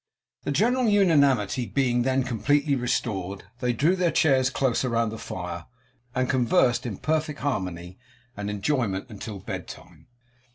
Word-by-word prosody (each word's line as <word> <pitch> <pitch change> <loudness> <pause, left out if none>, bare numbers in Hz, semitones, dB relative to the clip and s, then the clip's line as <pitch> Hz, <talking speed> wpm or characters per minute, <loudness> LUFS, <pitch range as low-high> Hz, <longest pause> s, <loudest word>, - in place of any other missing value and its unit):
The - - -1
general 240 - +2
unanimity 140 - +3
being 125 -3 +1
then 130 +1 +1
completely 140 +4 +1
restored, 100 -6 -2 0.2
they 125 -1 +1
drew 150 +10 +2
their 180 -2 +2
chairs 135 -5 +3
closer 130 -1 0
round 115 -2 +1
the 110 - -7
fire, 85 -2 -6 0.5
and 130 -1 +1
conversed 125 -1 +2
in 105 -5 -5
perfect 155 -1 -1
harmony 90 -8 -3 0.4
and 105 0 -4
enjoyment 105 -2 -1
until 105 0 -7
bed 95 - -6
time. - - -13
125 Hz, 140 wpm, -26 LUFS, 105-145 Hz, 0.5 s, unanimity